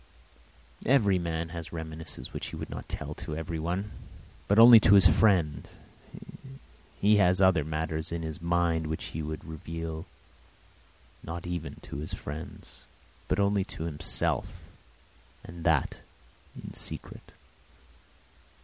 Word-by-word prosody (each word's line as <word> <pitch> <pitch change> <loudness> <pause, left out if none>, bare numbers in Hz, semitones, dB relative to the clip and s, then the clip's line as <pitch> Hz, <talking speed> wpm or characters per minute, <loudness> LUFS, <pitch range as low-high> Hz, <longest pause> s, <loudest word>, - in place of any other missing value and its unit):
Every 105 -8 +4
man 85 -1 -3
has 85 -1 -7
reminiscences 80 -1 -7
which - - -4
he - - -6
would - - -7
not - - -7
tell - - -5
to 75 - -6
everyone, 85 +5 -3 0.6
but 100 - +2
only 115 0 +10
to 105 -1 +6
his 95 -1 +7
friends. 85 -5 +3 1.3
He 105 +1 +5
has 90 -2 +4
other 95 -5 +4
matters 80 +1 -3
in 85 -1 -3
his 80 -1 -6
mind 85 -2 +1
which 80 0 -3
he 80 - -3
would 80 0 -5
not 80 - -9
reveal 80 0 -6 1.4
even 85 -2 -5
to - - -7
his 80 +6 -5
friends, 75 -2 -9 0.4
but 90 - 0
only 100 -1 +2
to 80 - -7
himself, 80 -1 +1 1.0
and 85 -1 -10
that 80 -5 +1 0.6
in - - -9
secret. - - -7
85 Hz, 130 wpm, -28 LUFS, 80-95 Hz, 1.4 s, only